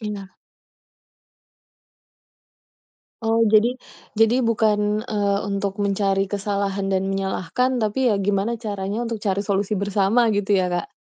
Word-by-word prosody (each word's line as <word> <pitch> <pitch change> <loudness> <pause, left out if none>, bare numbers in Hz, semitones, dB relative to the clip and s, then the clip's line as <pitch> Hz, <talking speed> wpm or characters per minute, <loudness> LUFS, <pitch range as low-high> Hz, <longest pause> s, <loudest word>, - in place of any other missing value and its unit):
iya. 205 -3 -6 2.9
Oh, 225 0 +2
jadi 230 +4 +4 0.4
jadi 225 +3 +4
bukan, 215 -2 +1
eee, 205 -4 0
untuk 200 -1 -2
mencari 195 -1 +1
kesalahan 200 0 -2
dan 190 -1 0
menyalahkan, 195 +6 -1
tapi, 240 +3 +1
ya, 210 - +2
gimana 200 +3 0
caranya 205 0 -3
untuk 230 -2 -4
cari 200 -1 -1
solusi 200 +1 0
bersama, 205 +4 +2
gitu, 205 0 +1
ya, 180 -1 0
Kak? 175 -1 -3
205 Hz, 120 wpm, -22 LUFS, 195-220 Hz, 2.9 s, jadi